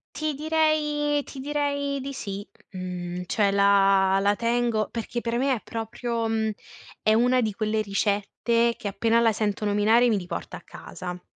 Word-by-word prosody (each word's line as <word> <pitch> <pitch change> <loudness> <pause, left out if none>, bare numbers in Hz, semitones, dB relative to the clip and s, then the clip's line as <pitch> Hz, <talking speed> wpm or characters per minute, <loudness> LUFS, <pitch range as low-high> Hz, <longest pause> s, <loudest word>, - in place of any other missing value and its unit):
Ti 310 -1 -1
direi 300 -1 +1
ti 270 - -10
direi 285 0 -1
di 275 +1 -5
sì, 200 -4 -6 0.3
mhmm, 180 -1 -5
cioè 205 0 +2
la 195 -1 +4
la 205 +1 +3
tengo 235 -2 0
perché 235 +1 -4
per 235 0 -1
me 270 +1 +2
è 230 - -3
proprio, 230 +1 -3
mhmm, 220 -1 0 0.5
è 215 - +3
una 245 +3 +3
di 220 -4 0
quelle 215 +1 -1
ricette 210 +3 0
che - - -5
appena 230 +4 +2
la 230 -1 +4
sento 210 -1 -2
nominare 215 +4 +4
mi 215 - +2
riporta 180 -1 -6
a - - -13
casa. 180 0 -8
225 Hz, 165 wpm, -25 LUFS, 200-255 Hz, 0.5 s, la